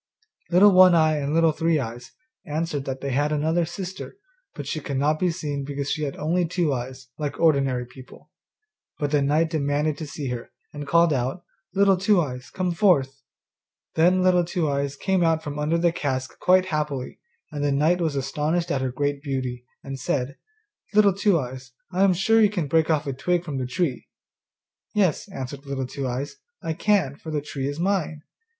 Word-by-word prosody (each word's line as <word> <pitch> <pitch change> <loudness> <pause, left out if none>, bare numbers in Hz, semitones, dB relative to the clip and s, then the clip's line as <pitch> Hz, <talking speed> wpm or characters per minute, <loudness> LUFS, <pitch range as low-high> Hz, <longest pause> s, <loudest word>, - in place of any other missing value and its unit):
Little 190 +4 +7
One 185 -1 +7
eye 155 -1 +3
and 140 0 -2
Little 165 0 +4
Three 160 +1 +1
eyes 120 -1 -6 0.3
answered 150 -2 -3
that 135 0 -4
they 140 - -3
had 145 +3 +1
another 160 +3 +1
sister, 185 - -7 0.4
but - - -6
she 155 - -3
could 140 -2 -4
not 150 +3 +1
be 180 - +2
seen 150 -5 -3
because 140 0 -3
she 155 - -2
had 140 - -4
only 170 +4 +1
two 170 -3 0
eyes, 130 +1 -6
like 145 -2 -3
ordinary 135 -6 +2
people. 130 +1 -15 0.7
But 145 -1 -2
the 145 -1 +3
knight 155 +4 +2
demanded 150 0 0
to 155 - -5
see 140 -1 -5
her, 120 -1 -5 0.2
and 145 -1 -7
called 170 0 +4
out, 130 +6 -2 0.3
'Little 195 -1 +4
Two 195 +1 +3
eyes, 130 -5 -3
come 185 -1 -2
forth.' 140 -8 +2 0.7
Then 180 +3 +3
Little 180 -1 +4
Two 170 -1 -1
eyes 140 0 -1
came 190 +4 +1
out 160 -1 +2
from 145 -1 -5
under 155 +3 +1
the 170 0 +2
cask 130 -5 -3
quite 185 0 +4
happily, 150 -4 -3 0.3
and 145 -1 -3
the 145 - +2
knight 155 +6 +2
was 160 -4 0
astonished 150 +5 -1
at 135 - 0
her 130 -1 -1
great 145 +2 -2
beauty, 130 -4 -4 0.2
and 135 -1 -6
said, 130 +1 -2 0.6
'Little 205 -2 +6
Two 195 -1 +2
eyes, 130 -1 -7 0.2
I 185 +1 0
am 190 -2 +4
sure 225 +5 +3
you 210 - +5
can 185 -6 -2
break 160 +2 +2
me 160 - +5
off 150 - -5
a 140 - -2
twig 175 +6 0
from 145 -5 -3
the 130 - -2
tree.' 130 -1 -2 0.9
'Yes,' 195 -2 +1
answered 140 -2 -7
Little 135 -1 -2
Two 135 +1 -4
eyes, 135 +3 -4 0.3
'I 160 - -1
can, 170 -6 +1
for 160 - -9
the 150 - 0
tree 140 -2 -4
is 145 +2 -4
mine. 170 -5 -1
150 Hz, 195 wpm, -24 LUFS, 140-175 Hz, 0.9 s, Little